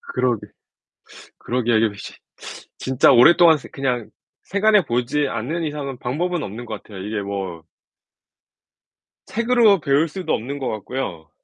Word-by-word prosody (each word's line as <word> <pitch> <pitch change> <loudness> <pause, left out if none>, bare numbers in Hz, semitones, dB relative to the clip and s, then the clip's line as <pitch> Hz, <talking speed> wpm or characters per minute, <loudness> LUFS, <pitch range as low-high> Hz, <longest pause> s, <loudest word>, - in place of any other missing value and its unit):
그러게 125 -3 0 0.9
그러게요. 120 -2 0
이렇게 110 -2 +1
쉽 - - -9 0.6
진짜 130 0 +3
오랫동안 165 +6 +7
쓰 - - -12
그냥 125 -4 -2 0.3
생활해 205 0 +3
보지 130 +4 0
않는 135 +10 -3
이상은 145 -4 -5
방법은 165 +8 -2
없는 110 +5 -7
것 - - -7
같아요. 100 -3 -11
이게 105 +3 -4
뭐 95 -4 -5 1.6
책으로 230 -3 +3
배울 145 +1 +2
수도 185 +3 -3
없는 135 +6 -3
것 130 - -3
같고요. 105 - -5
130 Hz, 290 characters per minute, -21 LUFS, 110-160 Hz, 1.6 s, 오랫동안